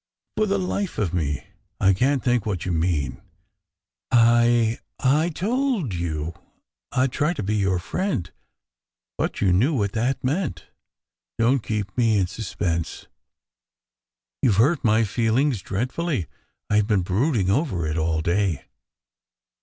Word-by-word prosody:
"For 215 - +1
the 200 0 +1
life 190 0 -2
of 95 -6 -1
me, 75 -6 -1 0.3
I 95 0 +4
can 130 +8 +2
t - - -24
think 120 -3 +2
what 95 -5 -2
you 90 - -1
mean. 80 -5 -1 0.9
I 120 -1 +4 0.2
I 150 +5 +3
told 215 - -1
you 85 -2 -3 0.6
I 130 0 +2
d 135 - -2
try 150 +5 +1
to 165 - -4
be 100 +3 -1
your 95 -3 +1
friend, 105 - -2 0.8
but - - -2
you 95 -3 +3
knew 130 - +3
what 100 -5 0
that 120 +5 -1
meant! 135 - -2 0.7
Don 120 +4 +3
t - - -17
keep 105 -3 -2
me 115 -3 +3
in 95 - +2
suspense." 90 -4 -3 1.4
"You 120 - +4
ve - - -1
hurt 140 +7 +3
my 110 -1 +4
feelings 115 +3 +1
dreadfully. 125 - -2 0.4
I 105 0 +3
ve 105 - -3
been 105 -4 +2
brood 115 - +1
ing 95 -2 +1
over 100 - 0
it 75 0 -2
all 80 0 0
day." 85 -3 0
110 Hz, 155 wpm, -24 LUFS, 90-135 Hz, 1.4 s, I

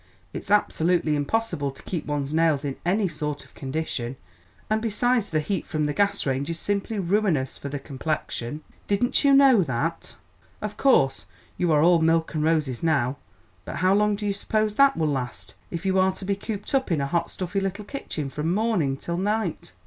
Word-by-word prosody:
It's - - -6
absolutely 175 -6 +2
impossible 145 -1 -1
to 135 - -12
keep 175 -4 -4
one's 145 -1 -2
nails 160 -3 +2
in 135 -2 -2
any 195 +3 +2
sort 150 -3 -4
of - - -22
condition, 135 -3 -3 0.5
and 215 0 +1
besides 235 0 +1
the 155 - +1
heat 180 +4 -3
from 155 -1 -1
the 150 - -1
gas 200 +2 +1
range 135 +2 -1
is 165 - -2
simply 205 +4 -2
ruinous 180 -8 +1
for 140 - -7
the 145 - -3
complexion. 140 -1 -4 0.2
Didn't 210 +8 +2
you 280 - +5
know 275 -5 +7
that? 160 +2 -2 0.4
Of 210 0 -5
course 135 - +3 0.3
you 175 -2 +1
are 150 -1 +4
all 170 -1 +5
milk 165 0 +2
and 155 -1 0
roses 155 -6 +1
now, 140 -5 +1 0.5
but - - -6
how 185 +2 +3
long 210 +1 +3
do 210 +1 -5
you 200 - +1
suppose 215 +1 0
that 275 +4 +4
will 160 - +1
last, 130 -4 -3 0.2
if 170 +2 -5
you 190 0 +2
are 190 0 +3
to 190 - -8
be 200 +1 0
cooped 205 +2 -6
up 265 -7 +1
in 160 - +2
a 140 - 0
hot, 170 +4 -1
stuffy 185 +2 -3
little 195 +2 -3
kitchen 155 - -5
from 150 +4 -1
morning 185 -10 +1
till 170 +4 -4
night?" 205 - -1
170 Hz, 195 wpm, -25 LUFS, 150-205 Hz, 0.5 s, know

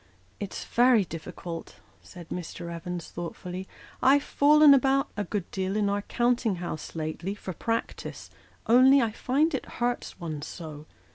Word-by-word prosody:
" - - -35
It's 200 - -5
very 240 -4 +4
difficult," 165 +1 -7 0.3
said 175 -3 -12
Mr. 170 -1 -6
Evans, 170 0 -5
thoughtfully; 180 +2 -6 0.2
" - - -20
I've 280 +2 +5
fallen 300 0 +6
about, 275 +1 +3
a 205 - -1
good 200 -4 -4
deal, 190 +1 -2
in 210 -1 +2
our 205 0 0
counting 240 -1 +1
house 170 -4 -6
lately, 165 +5 -3
for 190 -2 -6
practice, 230 +6 -4 0.3
only 260 +4 +7
I 230 -4 +1
find 280 +8 +1
it 270 - -3
hurts 240 -4 -2
one 155 -4 -5
so. 155 -1 -8
200 Hz, 155 wpm, -27 LUFS, 170-250 Hz, 0.3 s, only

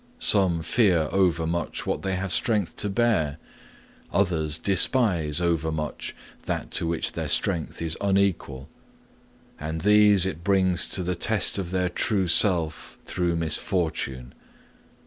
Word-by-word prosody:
Some 95 - +3
fear 85 -4 +2
overmuch 85 -3 -1
what - - -2
they 95 -1 -2
have 95 0 -4
strength 105 -5 0
to 105 - -1
bear; 95 -9 0 0.7
others 80 -6 0
despise 90 - +2
overmuch 80 -3 -2 0.3
that - - -3
to 85 - 0
which 85 0 -2
their - - -4
strength 85 0 -1
is 80 -1 -1
unequal. 95 -9 -1 0.9
All 75 +1 -4
these 105 +2 +4
it 85 -3 -5
brings 95 -2 +2
to 95 - 0
the 90 +1 -1
test 100 +3 +1
of 90 -3 -4
their 90 0 0
true 95 +1 0
self 85 -3 +1
through 85 -2 -1
misfortune. 80 -6 -2
90 Hz, 125 wpm, -25 LUFS, 80-100 Hz, 0.9 s, these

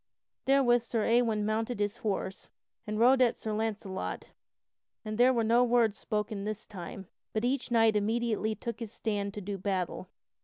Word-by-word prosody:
Therewith 260 -3 +4
Sir 230 -2 -1
Ewain 230 -3 +2
mounted 220 +2 -1
his 205 +2 -1
horse 195 -3 -3 0.4
and 215 0 -2
rode 255 +3 +5
at 240 -2 +3
Sir 220 - -4
Launcelot, 210 -3 -3 0.8
and 215 0 -3
there 245 +3 +5
were 235 -3 +1
no 235 +3 +4
words 235 -3 +3
spoken 210 -2 -2
this 215 +1 -4
time, 195 -1 -8 0.3
but 220 +2 0
each 260 +1 -1
knight 225 -2 +4
immediately 220 0 0
took 235 +2 -5
his 230 -3 -6
stand 205 -3 -2
to 210 - -5
do 200 0 -5
battle. 185 -1 -2
220 Hz, 165 wpm, -30 LUFS, 205-235 Hz, 0.8 s, rode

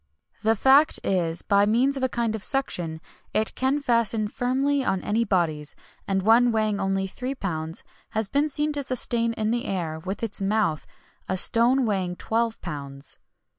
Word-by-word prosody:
[XXI 75 +5 -45
77] - - +3
The - - +2
fact 280 +4 +5
is 170 -3 0
that, - - -27
by 200 0 +4
means 250 +6 +2
of 270 - -4
a 260 - +1
kind 235 -2 -1
of 220 -2 -5
suction, 175 - -1 0.4
it 215 0 +1
can 265 +3 0
fasten 230 -5 +1
firmly 270 +4 0
on 190 -6 -1
any 225 +3 +1
bodies; 165 -8 -1 0.3
and 195 -1 0
one 235 +3 +5
weighing 215 -2 0
only 195 0 0
three 250 +7 -5
pounds 160 -7 -4 0.3
has 220 -1 -2
been 285 +7 +1
seen 295 +1 -1
to 290 - -1
sustain 240 -3 0
in 220 -1 -1
the 240 +2 -1
air, 165 -5 -3
with 190 +7 -5
its 215 -3 -3
mouth, 195 -6 0 0.4
a 185 - 0
stone 240 +6 +5
weighing 190 -4 -1
twelve 230 +3 -1
pounds. 140 -3 -7
220 Hz, 185 wpm, -25 LUFS, 185-245 Hz, 0.4 s, fact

